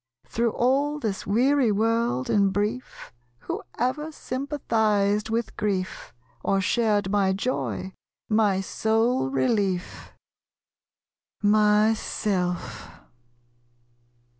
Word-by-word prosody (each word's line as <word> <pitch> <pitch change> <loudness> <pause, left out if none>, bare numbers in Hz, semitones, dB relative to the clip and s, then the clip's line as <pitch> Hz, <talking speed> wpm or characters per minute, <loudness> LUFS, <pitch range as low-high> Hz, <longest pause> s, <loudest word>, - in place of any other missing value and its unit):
Through 230 -1 -1
all 280 +4 +1
this 215 -8 -3
weary 250 +3 +3
world, 220 - +1
in 200 -2 +3
brief, 210 +6 -3 0.3
Who - - -4 0.2
ever 300 +6 -1
sympathized 220 -8 0
with 230 +1 -2
grief, 190 -3 -2 0.3
Or 195 - +2
shared 205 -1 +1
my 195 -2 +2
joy 190 -3 -3 0.3
my 210 -3 +2
sole 220 - +1
relief? 180 - -1 1.3
Myself. 205 - +1
210 Hz, 85 wpm, -25 LUFS, 195-235 Hz, 1.3 s, weary